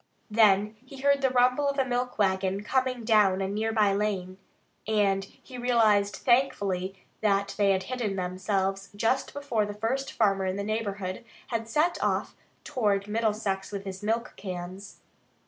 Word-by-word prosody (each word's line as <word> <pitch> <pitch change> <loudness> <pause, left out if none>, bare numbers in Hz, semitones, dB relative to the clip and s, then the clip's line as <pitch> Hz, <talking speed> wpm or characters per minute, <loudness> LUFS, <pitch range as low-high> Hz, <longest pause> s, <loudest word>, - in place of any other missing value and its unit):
Then 210 -1 +4
he 265 +1 -11
heard 280 0 +3
the 265 - +3
rumble 250 +3 +3
of 280 - -3
a 270 - +2
milk 250 0 -2
wagon 190 -1 +1
coming 255 0 0
down 210 -4 +4
a 195 - -1
near 215 +3 -1
by 210 -3 +3
lane, 195 -2 -2 0.5
and 200 -3 +2
he 250 +5 -12
realized 220 -5 +3
thankfully 200 -7 +1 0.3
that 200 -2 +1
they 200 -1 +3
had 190 -1 +2
hidden 235 -4 -3
themselves 195 +1 -1
just 225 +5 0
before 280 -6 -1
the 205 - -6
first 255 +6 -2
farmer 195 -3 +1
in 185 - -1
the 200 - -3
neighborhood 200 -3 -3 0.3
had 230 -1 -3
set 310 +8 +1
off - - 0 0.3
toward 205 -5 0
Middlesex 210 -3 -1
with 200 -1 -5
his 190 -1 -6
milk 225 +3 -1
cans. 185 +1 -7
210 Hz, 160 wpm, -28 LUFS, 195-240 Hz, 0.5 s, Then